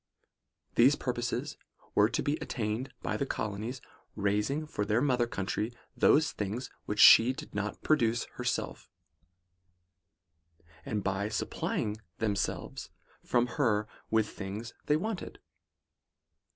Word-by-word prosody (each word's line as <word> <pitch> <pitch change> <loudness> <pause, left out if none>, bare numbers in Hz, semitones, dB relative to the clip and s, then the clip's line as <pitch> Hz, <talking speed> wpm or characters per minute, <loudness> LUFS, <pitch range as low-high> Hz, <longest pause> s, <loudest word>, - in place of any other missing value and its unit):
These - - +6
purposes - - -3 0.4
were - - +5
to - - -1
be 145 - +1
attained, 120 +1 -3
by - - -1
the 140 - -1
colonies 110 +4 -3 0.3
raising 105 +9 0
for 125 -8 -3
their 105 +2 +2
mother 125 -3 +2
country 105 +2 -2 0.2
those 150 0 +4
things 105 +5 -4
which 105 - -3
she 120 +5 +9
did - - -9
not 105 +1 -3
pro 155 - +4
duce 115 -3 +1
herself; - - -3 1.9
and 105 -2 -2
by 100 +2 -1
supplying 105 0 -2 0.2
themselves 105 -3 -2 0.3
from 120 -1 +2
her 115 -4 +1 0.2
with 110 -1 +2
things 105 +4 -6
they 150 - +4
wanted. 210 +2 -4
110 Hz, 120 wpm, -30 LUFS, 105-130 Hz, 1.9 s, she